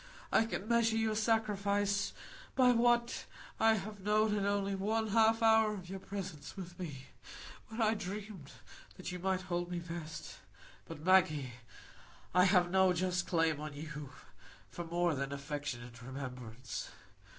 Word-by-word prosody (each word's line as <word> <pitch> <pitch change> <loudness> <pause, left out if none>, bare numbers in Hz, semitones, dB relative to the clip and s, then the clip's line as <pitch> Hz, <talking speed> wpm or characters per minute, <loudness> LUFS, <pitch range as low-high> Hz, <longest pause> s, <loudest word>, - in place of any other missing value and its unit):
I 225 - +4
can 210 -2 -4
measure 230 -1 +3
your 220 -1 +1
sacrifice 205 -2 +1 0.4
by 250 -1 +6
what 240 0 +2 0.3
I 225 0 +5
have 210 0 -5
known 210 +2 +2
in 200 -1 0
only 200 -1 0
one 215 +3 0
half 225 +1 +4
hour 220 -1 +5
of 185 -2 -9
your 195 - -4
presence 190 -6 -7
with 180 -2 -8
me, 145 -7 -6 0.6
when 220 +2 -8
I 220 0 +4
dreamed 200 -6 -6 0.5
that 185 - -5
you 180 - -5
might 185 0 -1
love 175 0 -1
me 175 - -3
best. 165 -2 -7 0.5
But, 160 -1 -8
Maggie, 155 -8 +4 0.8
I 180 +1 +6
have 180 -2 +4
no 190 -1 +5
just 180 0 0
claim 165 -3 +2
on 150 -1 -6
you 150 -1 -7 0.6
for 175 - -5
more 175 0 +1
than 140 -1 -3
affectionate 140 -4 -5
remembrance. 125 -2 -6
185 Hz, 150 wpm, -34 LUFS, 160-215 Hz, 0.8 s, by